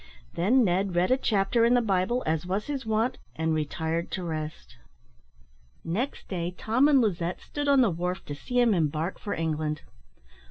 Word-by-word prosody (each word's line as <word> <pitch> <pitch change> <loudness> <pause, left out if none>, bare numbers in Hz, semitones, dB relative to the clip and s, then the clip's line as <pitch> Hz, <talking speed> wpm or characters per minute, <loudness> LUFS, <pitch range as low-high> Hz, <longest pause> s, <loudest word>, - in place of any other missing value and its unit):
Then 235 +9 +3
Ned 190 -1 +1
read 180 +6 +2
a - - +6
chapter 220 -1 +2
in 235 +2 +5
the - - +5
Bible, 205 +3 0
as 155 0 0
was 195 +3 -1
his 275 -5 -4
wont, 225 +4 0 0.2
and 160 0 0
retired 160 +2 -2
to 185 - -3
rest. 155 - -5 1.1
Next 220 +12 -3
day 175 -1 -3
Tom 250 +6 +3
and 290 -3 +5
Lizette 180 -5 -1
stood 290 -1 -4
on 280 -2 +5
the 230 -6 +3
wharf 180 +2 -3
to 145 - -5
see 245 - -2
him 240 -3 +4
embark 160 0 -1
for 205 - -3
England. 155 -2 -2
185 Hz, 175 wpm, -27 LUFS, 160-235 Hz, 1.1 s, a